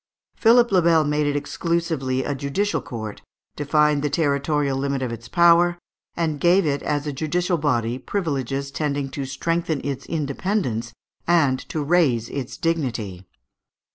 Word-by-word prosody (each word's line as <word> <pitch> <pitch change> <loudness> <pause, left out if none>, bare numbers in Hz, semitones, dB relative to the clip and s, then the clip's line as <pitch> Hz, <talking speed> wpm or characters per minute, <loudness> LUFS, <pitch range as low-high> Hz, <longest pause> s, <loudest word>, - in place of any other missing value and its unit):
Philippe 235 0 +5
le 185 - +5
Bel 165 -2 +4
made 150 0 0
it 145 - 0
exclusively 145 -3 -1
a 145 - -2
judicial 140 +10 -1
court, 110 -3 -7 0.3
defined 150 0 +2
the 150 - 0
territorial 145 -2 0
limit 135 0 -1
of 125 - -2
its 115 0 -8
power, 170 +4 +4 0.4
and 160 -3 -1
gave 175 +4 +4
it 145 -2 0
as 145 0 -1
a 150 - -3
judicial 175 +5 -1
body 120 -4 0
privileges 140 - -2
tending 140 -2 -2
to 140 0 -4
strengthen 165 +3 -1
its 140 -1 -4
independence 145 - -2 0.4
and 150 -7 +3
to 155 - -2
raise 140 -8 +2
its 135 -3 -5
dignity. 115 - -2
145 Hz, 145 wpm, -23 LUFS, 135-170 Hz, 0.4 s, Philippe